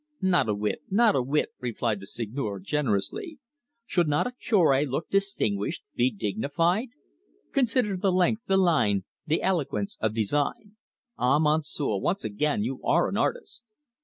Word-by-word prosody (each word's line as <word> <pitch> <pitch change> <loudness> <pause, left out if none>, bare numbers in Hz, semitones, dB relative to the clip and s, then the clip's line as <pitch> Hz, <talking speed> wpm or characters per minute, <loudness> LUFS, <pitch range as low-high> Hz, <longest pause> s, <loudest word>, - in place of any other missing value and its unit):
"Not 175 -10 +3
a 105 - +1
whit 105 +7 -2
not 215 +2 +4
a 135 - +3
whit," 140 +4 0
replied 115 -3 -2
the 100 - -9
Seigneur 110 -2 -3
generously. 145 - -2 0.5
"Should 175 -6 +1
not 150 0 +1
a 250 - -2
Cure 180 - +2
look 140 +4 -3
distinguished 170 - 0
be 120 +1 +2
dignified? 140 - 0 0.6
Consider 245 -5 +1
the 190 +1 +1
length, 185 +5 +2
the 195 - +3
line, 155 - +3 0.2
the 155 +2 +1
eloquence 140 - -1
of 110 -1 0
design! 145 - -1 0.4
Ah, 130 +4 +3
Monsieur, 150 -6 +1
once 195 - -1
again, 110 +2 0
you 130 +3 -4
are - - +2
an - - -4
artist! 470 - -2
150 Hz, 150 wpm, -27 LUFS, -, 0.6 s, not